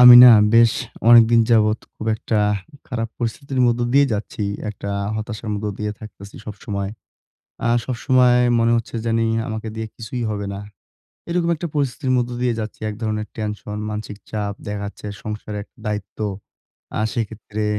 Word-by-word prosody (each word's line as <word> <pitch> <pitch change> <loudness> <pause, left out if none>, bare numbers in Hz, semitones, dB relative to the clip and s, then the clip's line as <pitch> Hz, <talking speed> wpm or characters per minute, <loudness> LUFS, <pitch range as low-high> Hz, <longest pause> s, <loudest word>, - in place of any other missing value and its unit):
আমি 125 0 +11
না 125 - +11 0.2
বেশ 115 -1 +7 0.4
অনেকদিন 115 0 +8
যাবৎ 110 -1 +4 0.2
খুব 110 - -7
একটা 110 0 -1 0.5
খারাপ 115 -3 -2
পরিস্থিতির 130 +3 -2
মধ্য 120 0 +2
দিয়ে 140 0 +6
যাচ্ছি। 105 0 -3 0.3
একটা 100 0 -6 0.3
হতাশার 110 0 -5
মধ্য 105 +1 -3
দিয়ে 105 -1 -2
থাকতেছি 100 -2 -11
সবসময়। 100 -2 -4 0.8
আ - - +3 0.2
সবসময় 125 0 +3 0.2
মনে 115 0 +3
হচ্ছে 115 0 -5
জানি 115 0 +2 0.2
আমাকে 110 0 -4
দিয়ে 110 0 -4
কিছুই 120 +2 -5
হবে 100 -1 -3
না। 100 - -5 0.7
এরকম 170 0 +1
একটা 170 +2 -4
পরিস্থিতির 135 -1 0
মধ্য 120 -1 0
দিয়ে 125 -1 +2
যাচ্ছি। 110 0 -5
এক 105 - -5
ধরনের 110 -1 -2
টেনশন, 105 -1 -4
মানসিক 105 -1 -5
চাপ 105 -2 -2
দেখা 105 0 -3
যাচ্ছে, 105 +1 -8 0.2
সংসারের 105 -1 -5 0.2
দায়িত্ব। 105 -2 -4 0.8
আর 110 - +1
সেক্ষেত্রে 110 -1 -3
110 Hz, 150 wpm, -21 LUFS, 105-120 Hz, 0.8 s, আমি